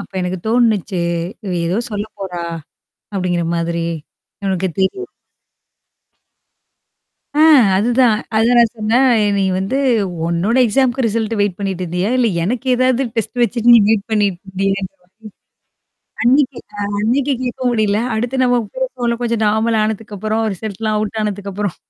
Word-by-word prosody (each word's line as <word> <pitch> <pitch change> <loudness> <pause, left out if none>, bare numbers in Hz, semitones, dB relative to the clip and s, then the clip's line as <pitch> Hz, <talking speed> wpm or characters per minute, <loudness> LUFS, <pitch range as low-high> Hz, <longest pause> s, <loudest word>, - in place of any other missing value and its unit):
அப்ப 200 - -11
எனக்கு 180 0 -3
தோணுனுச்சு. 215 -6 +1 0.4
"இவ 190 - -3
ஏதோ 180 +6 0
சொல்ல 205 0 -3 0.2
போறா?" 180 -3 -4 0.7
அப்பிடிங்கிற 180 -3 -1
மாதிரி. 170 0 -2 0.6
நமக்கு 190 -1 0
தெரியும். 380 - -1 2.3
ஆ, - - +7 0.3
அதுதான். 235 +2 +3 0.2
அதான் 235 +2 +4
நான் 230 -1 +3
சொன்னேன் 230 +5 +2 0.3
"நீ 195 - +1 0.2
வந்து 195 +8 -2 0.5
உன்னோட 175 +8 0
எக்ஸாம்க்கு 255 +2 +1
ரிசல்ட் 225 +1 -1
வெயிட் 200 -3 0
பண்ணிட்டு 195 -2 -3
இருந்தியா? 180 +4 -2
இல்ல 245 -2 +3 0.2
எனக்கு 245 +6 -2
ஏதாவது 255 +1 +2
டெஸ்ட் 235 +2 -2
வச்சுட்டு 235 +1 +3
நீ 235 - +8
வெயிட் 220 -2 +2
பண்ணிட்டு 200 -4 +1
இருந்தியா?" 195 +1 -1 1.4
அன்னக்கி 265 +1 +3 0.2
அ - - -1 0.2
அன்னக்கி 265 +6 +1
கேட்க 255 +1 -4
முடியல. 215 -3 +1 0.2
அடுத்து 245 +4 -1
நம்ம 245 -1 +3 0.2
பேசுவோம்ல 255 -2 -2
கொஞ்சம் 235 -2 -1
நார்மல் 220 +1 +1
ஆனதுக்கப்புறம், 215 0 -2
ரிசல்ட்லாம் 215 +2 -3
அவுட் 215 +1 -3
ஆனதுக்கப்பறம். 205 -2 -3
215 Hz, 130 wpm, -17 LUFS, 195-240 Hz, 2.3 s, நீ